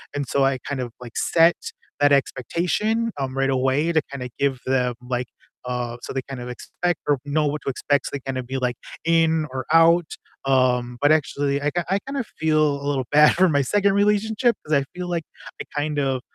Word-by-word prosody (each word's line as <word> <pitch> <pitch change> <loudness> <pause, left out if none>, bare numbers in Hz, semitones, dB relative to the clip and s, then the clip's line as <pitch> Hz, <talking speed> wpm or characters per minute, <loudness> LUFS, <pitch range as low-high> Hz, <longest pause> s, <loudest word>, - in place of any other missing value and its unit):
And 145 -2 -2
so 140 +2 +1
I 135 -1 +1
kind 135 -1 -4
of, 120 - -5
like, 120 -2 -10
set 165 +1 +4 0.4
that 145 0 +4
expectation, 180 - 0
um, 135 -1 -3
right 135 0 +1
away 135 +5 +1
to 160 - +3
kinda 130 -3 -5
give 135 -3 +1
them, 125 -2 +1
like, 125 0 -3 0.4
uh 125 -1 -3
so - - -7
they 130 - -1
kind 135 -2 -6
of 120 - -6
expect 175 +7 -3
or 145 -2 +2
know 150 +1 +1
what 150 0 -3
to - - -2
expect, 140 +2 0
so - - -6
they 140 - -2
kinda 130 -1 -2
be, 130 +2 -4
like, 125 -1 -1 0.3
in 160 -1 +3
or 130 -1 -4
out, 165 +1 +6 0.4
um, 125 -2 +2
but 145 - +4
actually 140 -2 +1
I 145 - +1
ki 175 +2 0
I 195 +1 +2
kind 275 0 -4
of 245 - -2
feel 155 -2 +2
a - - -7
little 135 -3 -1
bad 150 +1 +6
for 185 +2 +4
my 145 -2 +2
2nd 200 +7 +2
relationship 210 +3 +2
'cause 155 - -2
I 140 - +4
feel 180 0 -5
like 170 -2 -1 0.4
I - - -6
kind 150 0 -1
of, 135 -2 0
145 Hz, 215 wpm, -23 LUFS, 130-165 Hz, 0.4 s, out